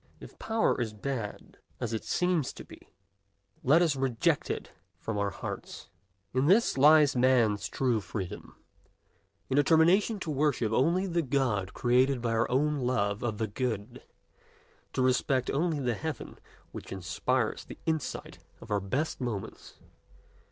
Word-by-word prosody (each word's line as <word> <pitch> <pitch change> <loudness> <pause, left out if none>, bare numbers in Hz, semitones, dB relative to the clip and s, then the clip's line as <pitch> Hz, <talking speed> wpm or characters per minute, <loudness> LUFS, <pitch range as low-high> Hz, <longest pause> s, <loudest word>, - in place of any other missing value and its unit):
If - - -13
Power 220 - +1
is 110 -2 -2
bad, 115 -1 -5 0.2
as 115 -1 -3
it 110 - -3
seems 180 -6 0
to - - -10
be, - - -16 0.7
let 155 +7 +5
us 160 -4 +2
reject 130 -4 0
it - - -4 0.3
from 105 +4 -4
our 100 0 +1
hearts. - - -7 0.4
In 130 +3 +2
this 210 +7 +4
lies 150 +1 +6
Man's 115 -6 +3
true 120 -3 0
freedom: 95 -1 -6 0.9
in 135 - 0
determination 170 +8 +4
to 160 - -3
worship 140 -6 +1
only 170 - +2
the 175 -2 0
God 120 - -1
created 125 +2 +3
by 115 -1 -1
our 115 +1 +1
own 150 +3 +1
love 105 -5 0
of 110 -3 -2
the 110 - 0
good, 115 +1 -4 0.9
to 130 - +1
respect 130 0 +1
only 160 +1 0
the 125 -3 0
heaven 155 +1 -6 0.3
which - - -9
inspires 95 -2 -1
the - - -10
insight 160 -3 -3 0.2
of 110 - -12
our 105 - +2
best 130 +11 -2
moments. 115 -6 -5
130 Hz, 145 wpm, -29 LUFS, 110-150 Hz, 0.9 s, lies